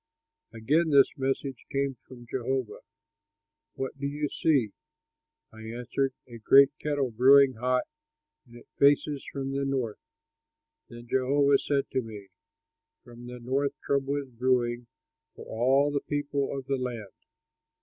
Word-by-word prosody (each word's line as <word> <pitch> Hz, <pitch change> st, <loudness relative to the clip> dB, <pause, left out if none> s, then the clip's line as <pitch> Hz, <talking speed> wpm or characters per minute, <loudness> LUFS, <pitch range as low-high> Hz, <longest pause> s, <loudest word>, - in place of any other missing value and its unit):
Again 150 Hz, +9 st, +1 dB
this 140 Hz, -2 st, +4 dB
message 135 Hz, -1 st, -3 dB
came 140 Hz, -1 st, -1 dB
from 120 Hz, -2 st, -12 dB
Jehovah, 130 Hz, 0 st, -3 dB, 1.0 s
"What 135 Hz, +1 st, -5 dB
do 140 Hz, -, -2 dB
you 145 Hz, +1 st, -3 dB
see?" 135 Hz, -10 st, +1 dB, 0.8 s
I 110 Hz, -, -13 dB
answered, 125 Hz, +4 st, -3 dB
"A 120 Hz, -2 st, -11 dB
great 135 Hz, +5 st, +6 dB
kettle 145 Hz, -4 st, -1 dB
brewing 135 Hz, +3 st, +6 dB
hot, 125 Hz, +2 st, +1 dB, 0.6 s
and 120 Hz, -, -17 dB
it 120 Hz, -, -14 dB
faces 145 Hz, 0 st, +3 dB
from 135 Hz, -1 st, -4 dB
the 140 Hz, 0 st, -2 dB
north." 130 Hz, -6 st, -2 dB, 0.9 s
Then 120 Hz, 0 st, -11 dB
Jehovah 140 Hz, +2 st, +3 dB
said 140 Hz, -1 st, 0 dB
to 130 Hz, -, 0 dB
me: 105 Hz, -4 st, -10 dB, 0.7 s
"From 120 Hz, 0 st, -12 dB
the 125 Hz, 0 st, -8 dB
north 135 Hz, +4 st, -1 dB
trouble 140 Hz, 0 st, 0 dB
is 140 Hz, -2 st, -4 dB
brewing 120 Hz, -1 st, 0 dB, 0.5 s
for -, -, -11 dB
all 135 Hz, +5 st, +2 dB
the 140 Hz, -1 st, -1 dB
people 145 Hz, -1 st, -2 dB
of 135 Hz, -, -6 dB
the 135 Hz, 0 st, -1 dB
land. 120 Hz, -5 st, -5 dB
135 Hz, 140 wpm, -27 LUFS, 120-140 Hz, 1.0 s, great